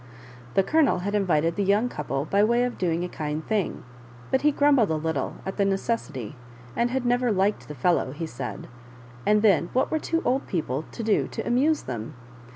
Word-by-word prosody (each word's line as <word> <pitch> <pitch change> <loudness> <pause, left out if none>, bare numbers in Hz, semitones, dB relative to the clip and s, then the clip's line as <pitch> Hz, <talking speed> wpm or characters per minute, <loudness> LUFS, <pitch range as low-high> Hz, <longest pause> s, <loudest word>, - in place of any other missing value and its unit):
The 195 - +5
Colonel 295 - +2
had 205 - -1
invited 170 -5 +2
the 205 - 0
young 205 +5 +3
couple 145 - -3
by 200 +5 +2
way 235 +3 +3
of 250 -1 -3
doing 170 -1 0
a - - -2
kind 155 -2 -4
thing, 210 -4 -1 0.5
but 265 - +2
he 300 - +4
grumbled 285 -6 +4
a 160 - +1
little 155 -3 -2
at 190 - -5
the 200 - +3
necessity, 195 - -2 0.4
and 235 +1 +1
had 255 0 -2
never 245 0 +2
liked 200 +1 0
the 150 - -7
fellow, 140 -1 +1
he 155 +4 -5
said 140 -7 -6 0.3
— 120 0 -19
and 210 +1 +4
then 190 -5 +4
what 255 - +1
were 315 - +1
two 330 +2 -1
old 260 +3 +1
people 155 -4 -2
to 230 - -6
do 220 -1 +2
to - - -5
amuse 285 +6 +2
them 115 -2 -6
200 Hz, 205 wpm, -25 LUFS, 160-240 Hz, 0.5 s, The